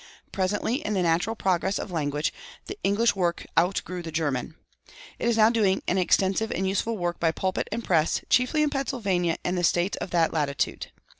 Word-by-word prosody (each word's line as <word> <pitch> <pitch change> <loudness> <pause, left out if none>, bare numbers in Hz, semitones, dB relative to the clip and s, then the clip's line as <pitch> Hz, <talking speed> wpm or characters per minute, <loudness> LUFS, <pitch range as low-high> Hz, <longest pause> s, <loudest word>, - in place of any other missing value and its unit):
Presently, 205 +5 0
in 210 - -2
the 185 - +1
natural 170 +7 +1
progress 190 -1 0
of - - -5
language, 150 -2 -1 0.3
the 400 - -6
English 205 +3 +2
work 175 -3 -1
outgrew 180 +1 0
the 165 -1 -7
German. 150 -2 -2 0.6
It 235 - +1
is 230 - +1
now 220 +1 +6
doing 205 -5 +1
an 190 - +2
extensive 190 +4 +2
and 190 +1 -1
useful 215 +4 -1
work 175 -2 -2
by 165 -1 +2
pulpit 185 +3 -2
and 230 +2 -3
press, 160 -5 +2
chiefly 255 +5 +3
in 300 - +1
Pennsylvania 200 - -1
and 180 - 0
the 175 - -1
States 175 +3 +1
of - - -5
that 170 -2 +2
latitude. 145 -3 -1
185 Hz, 190 wpm, -26 LUFS, 170-215 Hz, 0.6 s, now